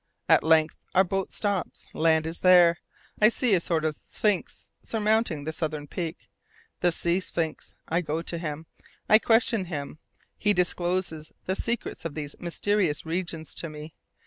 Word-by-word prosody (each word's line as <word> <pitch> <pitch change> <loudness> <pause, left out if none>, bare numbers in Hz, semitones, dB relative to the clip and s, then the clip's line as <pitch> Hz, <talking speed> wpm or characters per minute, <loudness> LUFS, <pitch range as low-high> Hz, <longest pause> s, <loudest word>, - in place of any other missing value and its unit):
At - - +5
length 160 -1 +4 0.2
our 190 - +7
boat 195 +1 -2
stops. 200 -4 -2
Land 160 -1 +3
is 165 +1 -4
there. 175 -2 +6 0.4
I 215 - +8
see 235 -1 +1
a 180 - +4
sort 160 -2 -1
of 155 -1 0
sphinx 210 +3 -2
surmounting 215 -8 0
the 160 +2 -4
southern 155 -2 -3
peak 165 +2 -5 0.5
the 175 - +3
sea 170 +2 +1
sphinx. 165 -4 -4
I 170 +2 +1
go 160 0 -3
to 170 0 -4
him. 155 -1 -5 0.4
I 215 - +7
question 225 -3 +3
him. 150 -3 -6 0.4
He 210 0 +3
discloses 175 -3 -1
the 190 - -1
secrets 235 -6 -3
of 165 -3 -5
these 150 -2 -5
mysterious 175 -2 0
regions 165 -1 -3
to 165 - -3
me. 150 +1 -9
170 Hz, 160 wpm, -27 LUFS, 160-190 Hz, 0.5 s, I